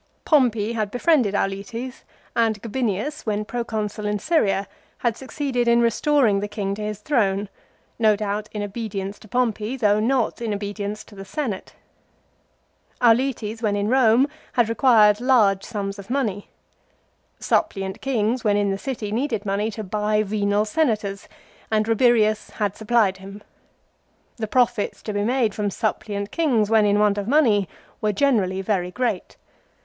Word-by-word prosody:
Pompey 235 Hz, -7 st, +2 dB
had 215 Hz, -3 st, -1 dB
befriended 245 Hz, -3 st, +2 dB
Auletes, 200 Hz, +6 st, -3 dB, 0.3 s
and 225 Hz, -2 st, +2 dB
Gabinius, 240 Hz, +5 st, -2 dB
when 210 Hz, 0 st, -1 dB
Proconsul 215 Hz, -2 st, -3 dB
in 210 Hz, 0 st, 0 dB
Syria, 205 Hz, -, +1 dB, 0.3 s
had 235 Hz, -3 st, 0 dB
succeeded 265 Hz, -2 st, -2 dB
in 235 Hz, 0 st, +5 dB
restoring 235 Hz, -2 st, +3 dB
the 205 Hz, -, -3 dB
king 205 Hz, -1 st, -3 dB
to 210 Hz, -, -6 dB
his 210 Hz, -1 st, -3 dB
throne, 205 Hz, -5 st, 0 dB, 0.5 s
no 215 Hz, -2 st, +4 dB
doubt 210 Hz, +1 st, -3 dB
in 210 Hz, -1 st, -4 dB
obedience 200 Hz, -2 st, -5 dB
to 215 Hz, -, -15 dB
Pompey, 230 Hz, +1 st, -1 dB
though 210 Hz, -4 st, +3 dB
not 240 Hz, +1 st, 0 dB
in 220 Hz, -3 st, -1 dB
obedience 205 Hz, +1 st, -5 dB
to -, -, -18 dB
the 195 Hz, -1 st, -9 dB
Senate. 225 Hz, -2 st, -4 dB, 1.3 s
Auletes, 230 Hz, -2 st, +2 dB
when 210 Hz, -3 st, +1 dB
in 205 Hz, +1 st, -1 dB
Rome, 255 Hz, +1 st, +4 dB, 0.3 s
had 240 Hz, -3 st, +2 dB
re -, -, 0 dB
quired 215 Hz, -3 st, +5 dB
large 215 Hz, -7 st, +3 dB
sums 200 Hz, -2 st, -4 dB
of 200 Hz, -, -11 dB
money. 225 Hz, -7 st, -2 dB, 0.9 s
Suppliant 195 Hz, -, -1 dB
kings 240 Hz, -2 st, 0 dB
when 205 Hz, -1 st, +2 dB
in 205 Hz, -1 st, +1 dB
the 195 Hz, -, -3 dB
city 230 Hz, -5 st, -4 dB
needed 225 Hz, -3 st, -1 dB
money 200 Hz, +2 st, 0 dB
to 220 Hz, 0 st, -6 dB
buy 210 Hz, +2 st, 0 dB
venal 205 Hz, 0 st, 0 dB
Senators, 210 Hz, -6 st, -1 dB, 0.4 s
and 215 Hz, 0 st, +1 dB
Rabirius 225 Hz, -2 st, +3 dB
had 205 Hz, -2 st, -2 dB
supplied 220 Hz, -3 st, +2 dB
him. 195 Hz, +2 st, -11 dB, 0.9 s
The 220 Hz, -2 st, -3 dB
profits 240 Hz, -3 st, 0 dB
to 215 Hz, -, -4 dB
be 205 Hz, -, -1 dB
made 235 Hz, -2 st, +1 dB
from 205 Hz, 0 st, -1 dB
suppliant 205 Hz, 0 st, -3 dB
kings 240 Hz, -11 st, +1 dB
when 220 Hz, -2 st, +5 dB
in 205 Hz, 0 st, +3 dB
want 210 Hz, -1 st, +2 dB
of 200 Hz, -, -4 dB
money 230 Hz, -, +3 dB, 0.3 s
were 215 Hz, -, +1 dB
generally 195 Hz, -7 st, +1 dB
very 185 Hz, -3 st, 0 dB
great. 250 Hz, +6 st, -3 dB
215 Hz, 155 wpm, -23 LUFS, 205-240 Hz, 1.3 s, in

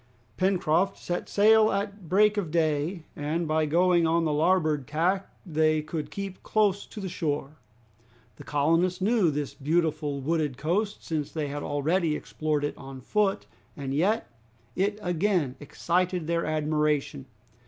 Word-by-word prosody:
Pencroft 185 Hz, -1 st, +1 dB
set 175 Hz, -, -4 dB
sail 215 Hz, +1 st, +5 dB
at 200 Hz, -3 st, -4 dB
break 210 Hz, +2 st, +4 dB
of 200 Hz, -6 st, -2 dB
day, 160 Hz, +1 st, 0 dB
and 155 Hz, +3 st, -2 dB
by 155 Hz, 0 st, +1 dB
going 175 Hz, +1 st, +3 dB
on 165 Hz, +1 st, +2 dB
the 155 Hz, -, +1 dB
larboard 155 Hz, -3 st, +2 dB
tack 180 Hz, +6 st, 0 dB, 0.2 s
they 155 Hz, -2 st, +1 dB
could 155 Hz, 0 st, -4 dB
keep 195 Hz, -2 st, -6 dB
close 205 Hz, -2 st, +1 dB
to -, -, -9 dB
the 195 Hz, -, -4 dB
shore. 150 Hz, -4 st, -3 dB, 0.8 s
The -, -, -10 dB
colonists 165 Hz, +5 st, +1 dB
knew 205 Hz, -2 st, +3 dB
this 145 Hz, -1 st, -3 dB
beautiful 155 Hz, -1 st, 0 dB
wooded 150 Hz, -2 st, -1 dB
coast, 200 Hz, +7 st, -1 dB
since 155 Hz, -3 st, -3 dB
they 150 Hz, -3 st, -3 dB
had 145 Hz, +1 st, -4 dB
already 155 Hz, +3 st, 0 dB
explored 150 Hz, -1 st, -2 dB
it 145 Hz, -, -2 dB
on 135 Hz, -1 st, -9 dB
foot, 195 Hz, -, 0 dB, 0.3 s
and 135 Hz, -2 st, -4 dB
yet 195 Hz, +10 st, +1 dB, 0.5 s
it 205 Hz, +2 st, 0 dB
again 175 Hz, -6 st, 0 dB
excited 175 Hz, +4 st, -1 dB
their 170 Hz, +1 st, -1 dB
admiration. 150 Hz, -2 st, 0 dB
165 Hz, 145 wpm, -27 LUFS, 150-185 Hz, 0.8 s, sail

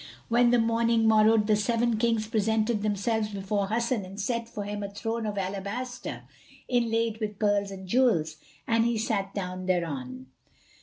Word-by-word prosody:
When 240 Hz, +1 st, +4 dB
the 245 Hz, -, +4 dB
morning 230 Hz, 0 st, +2 dB
morrowed, 220 Hz, 0 st, +5 dB
the 215 Hz, 0 st, +3 dB
Seven 230 Hz, +2 st, +1 dB
Kings 230 Hz, -2 st, +1 dB
presented 220 Hz, 0 st, +1 dB
themselves 215 Hz, +1 st, 0 dB
before 200 Hz, 0 st, -2 dB
Hasan 230 Hz, +1 st, 0 dB
and 190 Hz, +2 st, -9 dB
set 230 Hz, +2 st, -2 dB
for 210 Hz, -3 st, -5 dB
him 205 Hz, +1 st, -4 dB
a 200 Hz, -, -4 dB
throne 225 Hz, +2 st, -3 dB
of 205 Hz, -1 st, -4 dB
alabaster 200 Hz, +6 st, -4 dB, 0.4 s
inlaid 230 Hz, -2 st, 0 dB
with 210 Hz, -2 st, -4 dB
pearls 205 Hz, -1 st, +1 dB
and 190 Hz, -1 st, -9 dB
jewels, 180 Hz, -10 st, +2 dB, 0.3 s
and 230 Hz, 0 st, +2 dB
he 235 Hz, -1 st, +1 dB
sat 205 Hz, -3 st, -1 dB
down 185 Hz, -1 st, -4 dB
thereon. 135 Hz, -8 st, -2 dB
215 Hz, 160 wpm, -27 LUFS, 200-230 Hz, 0.4 s, morrowed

